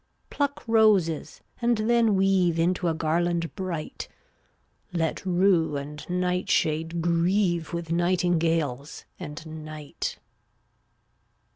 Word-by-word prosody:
Pluck 285 Hz, -1 st, -1 dB
roses 205 Hz, -9 st, +2 dB, 0.2 s
and 235 Hz, -1 st, +2 dB
then 225 Hz, -1 st, +3 dB
weave 190 Hz, -3 st, +3 dB
Into 175 Hz, +2 st, +1 dB
a 165 Hz, -, +1 dB
garland 170 Hz, +1 st, 0 dB
bright; 180 Hz, -6 st, -5 dB, 0.8 s
Let 165 Hz, -2 st, -1 dB
rue 175 Hz, -4 st, +3 dB
and 145 Hz, +1 st, -7 dB
nightshade 170 Hz, -2 st, 0 dB
grieve 175 Hz, 0 st, +1 dB
With 170 Hz, -1 st, -4 dB
nightingales 165 Hz, -5 st, 0 dB
and 150 Hz, +2 st, -7 dB, 0.2 s
night. 155 Hz, -2 st, -5 dB
170 Hz, 95 wpm, -26 LUFS, 160-185 Hz, 0.8 s, then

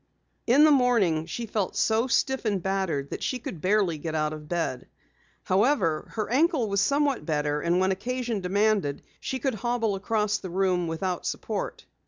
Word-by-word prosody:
In 265 Hz, +5 st, +6 dB
the 310 Hz, -, +7 dB
morning 225 Hz, -, +3 dB
she 235 Hz, +6 st, -4 dB
felt 210 Hz, -3 st, -2 dB
so 225 Hz, +3 st, +2 dB
stiff 265 Hz, +1 st, +1 dB
and 205 Hz, -3 st, +1 dB
battered 190 Hz, -8 st, -1 dB
that -, -, -5 dB
she 255 Hz, -, -1 dB
could 180 Hz, -9 st, -7 dB
barely 185 Hz, -5 st, +1 dB
get 160 Hz, +1 st, -4 dB
out 155 Hz, 0 st, 0 dB
of 150 Hz, -1 st, -9 dB
bed. 165 Hz, -8 st, -2 dB, 0.6 s
However, 190 Hz, -, +1 dB
her 215 Hz, -2 st, -1 dB
ankle 275 Hz, 0 st, +2 dB
was 200 Hz, 0 st, +1 dB
somewhat 280 Hz, +3 st, +1 dB
better 150 Hz, -2 st, -1 dB
and 170 Hz, +3 st, +1 dB
when 190 Hz, +1 st, +2 dB
occasion 240 Hz, +2 st, -2 dB
demanded, 200 Hz, -5 st, +1 dB, 0.2 s
she 265 Hz, -, -3 dB
could 260 Hz, +1 st, -1 dB
hobble 230 Hz, -1 st, -1 dB
across 210 Hz, +1 st, 0 dB
the 185 Hz, -, -7 dB
room 180 Hz, -1 st, +1 dB
without 175 Hz, +3 st, -2 dB
support. -, -, -4 dB
200 Hz, 175 wpm, -26 LUFS, 170-240 Hz, 0.6 s, the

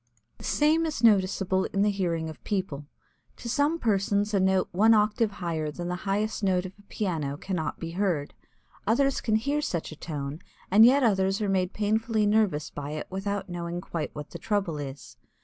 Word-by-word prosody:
The -, -, -12 dB
same 315 Hz, +2 st, +3 dB
is 295 Hz, -6 st, -4 dB
noticeable 190 Hz, -3 st, +3 dB
in 200 Hz, 0 st, 0 dB
the 210 Hz, -, +3 dB
hearing 170 Hz, -5 st, -1 dB
of 155 Hz, -, -9 dB
people. 180 Hz, -9 st, -3 dB, 0.5 s
To -, -, -8 dB
some 285 Hz, +7 st, +1 dB
persons 205 Hz, -4 st, +1 dB
a 200 Hz, -, +3 dB
note 190 Hz, 0 st, +2 dB
one 220 Hz, +5 st, +5 dB
octave 215 Hz, 0 st, +2 dB
higher 165 Hz, -5 st, -3 dB
than 175 Hz, +4 st, -5 dB
the 180 Hz, -, -1 dB
highest 215 Hz, +3 st, 0 dB
note 185 Hz, -1 st, +2 dB
of 185 Hz, -, -7 dB
a -, -, -15 dB
piano, 165 Hz, -9 st, -3 dB
cannot 165 Hz, -3 st, -3 dB
be 165 Hz, -1 st, -5 dB
heard. 175 Hz, -6 st, -1 dB, 0.5 s
Others 275 Hz, +5 st, +2 dB
can 220 Hz, -, +1 dB
hear 280 Hz, +7 st, 0 dB
such 170 Hz, -, -3 dB
a -, -, -8 dB
tone, 145 Hz, -1 st, -5 dB, 0.3 s
and 215 Hz, +4 st, +8 dB
yet 275 Hz, +2 st, +4 dB
others 195 Hz, -3 st, +2 dB
are 210 Hz, -2 st, -1 dB
made 185 Hz, -1 st, +1 dB
painfully 220 Hz, +1 st, +1 dB
nervous 205 Hz, -8 st, +1 dB
by 145 Hz, 0 st, -5 dB
it 155 Hz, -, -4 dB
without 200 Hz, +1 st, -3 dB
knowing 175 Hz, -1 st, -4 dB
quite 170 Hz, -4 st, -4 dB
what 150 Hz, 0 st, -7 dB
the -, -, -7 dB
trouble 195 Hz, -8 st, -1 dB
is. 140 Hz, -1 st, -8 dB
195 Hz, 190 wpm, -27 LUFS, 170-215 Hz, 0.5 s, and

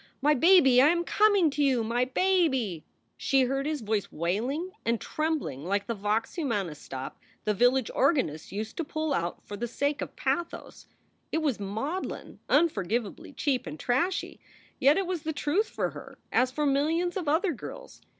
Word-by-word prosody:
My 295 Hz, +2 st, +4 dB
baby, 280 Hz, -4 st, +6 dB
I 280 Hz, -, +7 dB
am 340 Hz, +2 st, +2 dB
coming 400 Hz, -4 st, +3 dB
to 290 Hz, +1 st, 0 dB
you! 260 Hz, -4 st, +2 dB
My 240 Hz, +3 st, +1 dB
baby! 265 Hz, -, +1 dB, 0.2 s
" -, -, -45 dB
She 270 Hz, -1 st, +2 dB
heard 270 Hz, +3 st, -1 dB
his 305 Hz, -3 st, -2 dB
voice 215 Hz, -2 st, -1 dB
wailing 240 Hz, -, -2 dB
and 230 Hz, -1 st, 0 dB
trembling 310 Hz, -, -2 dB
like 200 Hz, +3 st, -1 dB
the 230 Hz, -, -2 dB
vox 210 Hz, +2 st, -1 dB
humana 220 Hz, -, -2 dB
stop 135 Hz, -2 st, -8 dB, 0.2 s
the 210 Hz, -, +1 dB
village 245 Hz, +3 st, +3 dB
organist 260 Hz, -, +1 dB
used 215 Hz, +2 st, -5 dB
to 335 Hz, -, -1 dB
pull 310 Hz, -1 st, -2 dB
out 170 Hz, -4 st, -3 dB
for 205 Hz, -, -6 dB
the 240 Hz, +4 st, -3 dB
sake 285 Hz, +4 st, -1 dB
of -, -, -6 dB
pathos. 345 Hz, -1 st, -3 dB, 0.4 s
It 320 Hz, -, 0 dB
was 275 Hz, -8 st, 0 dB
maudlin, 225 Hz, -, -4 dB
unforgivably 235 Hz, -, 0 dB
cheap 265 Hz, -3 st, -1 dB
and 150 Hz, -, -7 dB
trashy, 275 Hz, +10 st, -1 dB, 0.4 s
yet 285 Hz, +2 st, +5 dB
it 390 Hz, -, +1 dB
was 355 Hz, -2 st, -3 dB
the 315 Hz, 0 st, -3 dB
truth 315 Hz, +9 st, 0 dB
for -, -, -2 dB
her, -, -, -11 dB
as 255 Hz, 0 st, +3 dB
for 295 Hz, +3 st, -2 dB
millions 320 Hz, +6 st, +1 dB
of 360 Hz, -5 st, -3 dB
other 330 Hz, +5 st, +2 dB
girls. -, -, -10 dB
275 Hz, 180 wpm, -28 LUFS, 220-320 Hz, 0.4 s, I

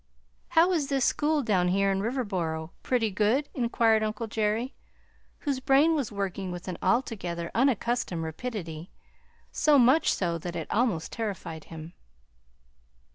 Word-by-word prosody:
"How 340 Hz, +3 st, +6 dB
is 315 Hz, -6 st, +1 dB
this 270 Hz, -3 st, +1 dB
school 300 Hz, -1 st, +1 dB
down 190 Hz, -6 st, +2 dB
here 195 Hz, +2 st, +2 dB
in 195 Hz, 0 st, 0 dB
Riverboro 185 Hz, -9 st, -2 dB
pretty 230 Hz, -4 st, 0 dB
good?" 220 Hz, +9 st, +1 dB
inquired 230 Hz, -3 st, +2 dB
uncle 215 Hz, +1 st, -2 dB
Jerry, 220 Hz, +3 st, -1 dB, 0.7 s
whose 280 Hz, -4 st, -1 dB
brain 275 Hz, +5 st, +4 dB
was 280 Hz, -8 st, -1 dB
working 195 Hz, -2 st, -3 dB
with 175 Hz, +1 st, -7 dB
an 180 Hz, -, -5 dB
altogether 180 Hz, -9 st, -1 dB
unaccustomed 240 Hz, -8 st, +1 dB
rapidity, 165 Hz, -2 st, -5 dB, 0.6 s
so 300 Hz, -2 st, +4 dB
much 270 Hz, +5 st, +5 dB
so 170 Hz, -3 st, -1 dB
that 175 Hz, +2 st, -6 dB
it 165 Hz, -2 st, -3 dB
almost 210 Hz, -8 st, 0 dB
terrified 195 Hz, -8 st, -5 dB
him. 160 Hz, +1 st, -9 dB
215 Hz, 135 wpm, -28 LUFS, 180-255 Hz, 0.7 s, How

